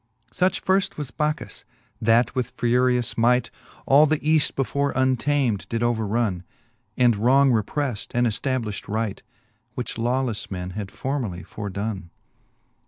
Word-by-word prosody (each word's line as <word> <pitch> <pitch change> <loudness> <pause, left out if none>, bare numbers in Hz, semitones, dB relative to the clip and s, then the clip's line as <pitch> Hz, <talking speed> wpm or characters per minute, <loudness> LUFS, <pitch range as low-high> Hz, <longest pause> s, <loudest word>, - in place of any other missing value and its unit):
Such 185 +1 0
firft 190 0 +1
was 145 -5 -5
Bacchus^ 150 +5 -3 0.4
that 115 +2 +3
with 125 -1 -2
furious 125 0 +1
might 125 +2 +3 0.3
All 145 +3 +6
th'Eaft 155 0 +2
before 140 +1 0
untam'd 130 -4 +1
did 115 0 -1
overronne, 110 -4 0 0.6
And 120 -3 +4
wrong 130 +6 +4
reprelTed, 120 +1 -1
and 120 0 +3
eftabliflit 115 -2 -2
right, 110 -1 -2 0.5
Which 125 - -4
lawlefle 120 -1 -1
men 90 -1 -5
had 100 +1 -5
formerly 120 -11 -3
fordonne. 100 -2 -5
120 Hz, 120 wpm, -24 LUFS, 110-135 Hz, 0.6 s, All